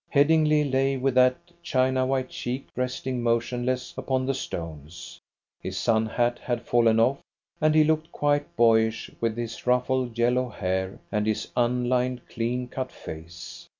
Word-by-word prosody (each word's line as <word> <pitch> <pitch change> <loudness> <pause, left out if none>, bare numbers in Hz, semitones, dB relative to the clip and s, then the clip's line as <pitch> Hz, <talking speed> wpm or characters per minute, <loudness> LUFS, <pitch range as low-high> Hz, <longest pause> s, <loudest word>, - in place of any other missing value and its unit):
Headingly 155 +1 +4
lay 135 -1 +1
with 135 0 0
that 125 0 +5 0.3
china 130 -4 +1
white 130 -1 -1
cheek 125 +2 -4
resting 125 0 -2
motionless 120 +2 -1
upon 130 -1 -1
the 135 - 0
stones. 85 - -7 0.4
His - - -5
sun 110 -1 +2
hat 120 +2 0
had 120 -2 -3
fallen 115 -2 +3
off, 130 +4 +2 0.4
and 155 0 +3
he 155 - +7
looked 155 +1 0
quite 145 0 0
boyish 110 -1 +3
with 115 -1 0
his 120 +1 -6
ruffled 125 -1 +1
yellow 125 +1 +2
hair 95 -2 -2
and 105 -1 0
his 110 - -1
un 125 0 +1
lined, 125 0 0
clean 125 +2 -2
cut 130 +1 -5
face. 85 +2 -10
125 Hz, 150 wpm, -26 LUFS, 115-130 Hz, 0.4 s, he